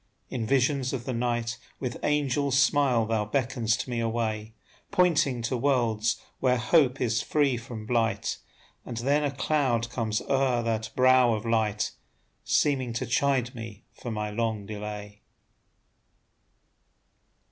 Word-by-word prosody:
In 115 -4 -2
visions 135 +1 +1
of 125 -3 -4
the 130 - -2
night 120 -1 -1 0.2
With 125 -3 -4
angel 145 -1 +1
smile 135 -3 +3
thou 110 -1 0
beckon'st 115 0 -1
me 120 -2 -2
away, 110 -1 -2 0.3
Pointing 155 -9 +2
to 115 +3 -1
worlds 120 -4 +1 0.2
where 125 -1 +3
hope 135 +1 +3
is 115 -2 +1
free 145 -4 +1
from 115 -2 -7
blight; 115 -1 0 0.4
And 120 - -7
then 140 +5 +1
a 145 - +1
cloud 135 -4 0
comes 110 -3 -1
o'er 130 -3 +1
that 110 -1 -1
brow 130 -2 +5
of 110 +1 -6
light, 110 -2 0 0.5
Seeming 130 -5 +1
to 115 +3 -2
chide 125 0 +1
me 115 -2 -9
for 120 - -7
my 105 -1 -3
long 110 -2 -2
delay. 105 0 -7
120 Hz, 135 wpm, -27 LUFS, 110-135 Hz, 0.5 s, brow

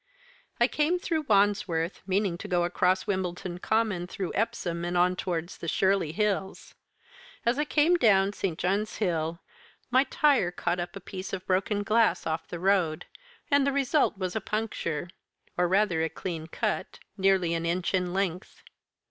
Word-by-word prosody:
I 240 - +5
came 305 +6 +1
through 325 -4 -2
Wandsworth, 195 -5 +1
meaning 195 -1 +1
to - - -6
go 175 -3 +1
across 180 +2 +1
Wimbledon 180 -3 -3
Common, 210 -4 0
through 185 0 -4
Epsom, 195 -6 -2
and 175 +1 -1
on 180 +1 +3
towards 175 -1 -4
the 170 - -6
Shirley 190 -2 +2
Hills. 195 +1 -2 0.7
As 240 +4 +2
I 300 - +1
came 315 +4 +3
down 200 - +4
St. 185 -5 -2
John's 200 +5 -1
Hill 170 -4 -1 0.5
my 260 +2 +5
tyre 280 - +3
caught 175 0 -2
up 175 +3 -5
a - - -5
piece 190 +1 -7
of 185 -1 -4
broken 195 +2 0
glass 220 +2 +2
off 160 0 -2
the 175 - -6
road, 180 -4 +1 0.5
and 285 -1 +4
the - - +3
result 275 -3 +1
was 185 0 -3
a 220 - -1
puncture, 205 -7 -3 0.5
or 180 0 +2
rather 185 -3 +2
a 160 - 0
clean 160 -1 -5
cut, 215 +5 -3 0.2
nearly 190 -3 +2
an 165 0 -1
inch 175 +2 -1
in 180 -1 0
length. 185 -2 -3
190 Hz, 165 wpm, -28 LUFS, 175-215 Hz, 0.7 s, I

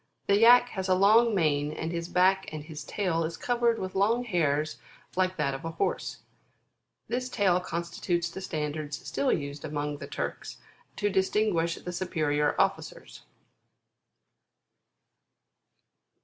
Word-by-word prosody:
The 200 0 +3
Yack 245 +2 +7
has 190 -3 -4
a 185 - +5
long 215 +4 +5
mane 150 -3 +1
on 160 +1 -3
his 170 0 -3
back 190 +1 +2
and 155 -1 -6
his 155 -1 -8
tail 165 -1 -1
is 160 +1 -4
covered 240 -1 +1
with 185 -2 -5
long 220 +5 +2
hairs 155 -8 0 0.4
like 185 0 +1
that 140 -3 0
of 135 +4 -6
a 165 - -3
horse - - -2 0.8
This 250 +1 -2
tail 195 -7 +2
constitutes 170 0 -2
the 175 +3 -8
standards 150 -3 -3
still 275 - 0
used 140 0 -3
among 150 -1 -3
the - - -7
Turks - - -5 0.4
to 205 -1 0
distinguish 190 -3 +1
the 180 - -7
superior 150 -5 0
officers. - - -2
175 Hz, 135 wpm, -28 LUFS, 155-200 Hz, 0.8 s, Yack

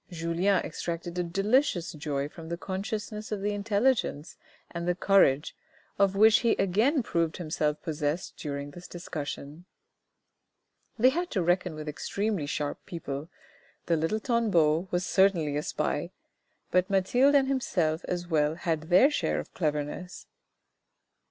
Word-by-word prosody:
Julien 170 +3 +1
extracted 170 +2 -4
a - - +1
delicious 195 - +1
joy 145 -3 -3
from 160 +1 -11
the 170 - -3
consciousness 210 +4 -5
of 210 -2 -2
the 205 +1 0
intelligence 205 - 0 0.4
and 170 0 -4
the 180 - +2
courage, 175 -7 +3 0.4
of 195 -1 +3
which 220 +2 +6
he 235 -2 +3
again 230 - +2
proved 165 -5 -1
himself 155 -3 -1
possessed 155 0 -2
during 140 -1 -5
this 175 +4 -11
discussion. 155 -2 -6 1.3
They 245 +3 +6
had 345 +6 -2
to 190 -6 0
reckon 175 -1 +1
with 155 0 -7
extremely 195 +2 -2
sharp 145 0 -3
people, 150 -2 -5 0.6
the 170 - +2
little 165 +7 0
Tanbeau 190 - +2
was 180 0 -1
certainly 180 -8 +2
a 150 - 0
spy, - - -2 0.6
but 185 +2 +2
Mathilde 245 +9 +3
and 270 -1 +4
himself 175 -12 0
as 175 -1 -3
well 155 -2 +1
had 160 -2 -2
their 190 +12 +6
share - - 0
of - - -8
cleverness. 155 +3 -3
175 Hz, 140 wpm, -28 LUFS, 155-205 Hz, 1.3 s, which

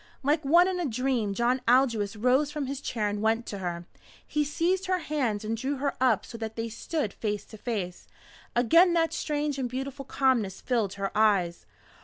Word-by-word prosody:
Like 300 +3 +2
one 340 +6 +5
in 370 -1 -1
a 350 - -1
dream 240 -4 -1
John 245 +3 +1
Aldous 230 -5 +3
rose 255 +6 +2
from 295 -1 -3
his 275 +1 -4
chair 220 -6 -1
and 205 0 -2
went 225 +2 +1
to 200 - -6
her. 175 -2 -4 0.4
He 300 - 0
seized 350 +6 0
her 370 0 +2
hands 260 - -2
and 225 +1 -1
drew 265 +5 -2
her 280 +1 -1
up 250 -6 +3
so 230 - -9
that 220 -1 -5
they 230 0 -3
stood 230 0 -3
face 210 -2 -3
to 220 - -12
face. 200 -7 -4 0.5
Again 330 +10 +5
that 330 -1 +2
strange 295 -2 -2
and 250 -2 -1
beautiful 270 +2 -5
calmness 250 -9 +1
filled 225 -6 0
her 195 +1 -4
eyes. 200 -5 +2
250 Hz, 195 wpm, -28 LUFS, 215-290 Hz, 0.5 s, one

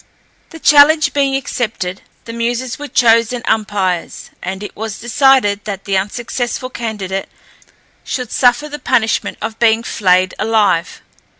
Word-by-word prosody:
The 325 - -11
challenge 300 +1 +5
being 275 -1 +1
accepted, 220 -8 -3 0.2
the 230 - -7
Muses 235 +2 -2
were 290 - -6
chosen 230 -1 +2
umpires, 195 -5 -2
and 190 +2 -5
it 205 - -8
was 220 -1 -5
decided 240 -4 +3
that 195 -2 -6
the 195 - -1
unsuccessful 240 +5 -3
candidate 200 -5 -4 0.7
should 250 -3 -4
suffer 245 +4 +2
the 295 0 -7
punishment 230 -6 0
of 225 0 -5
being 230 -1 +3
flayed 185 -4 +2
alive. 210 -6 +1
225 Hz, 130 wpm, -16 LUFS, 200-255 Hz, 0.7 s, challenge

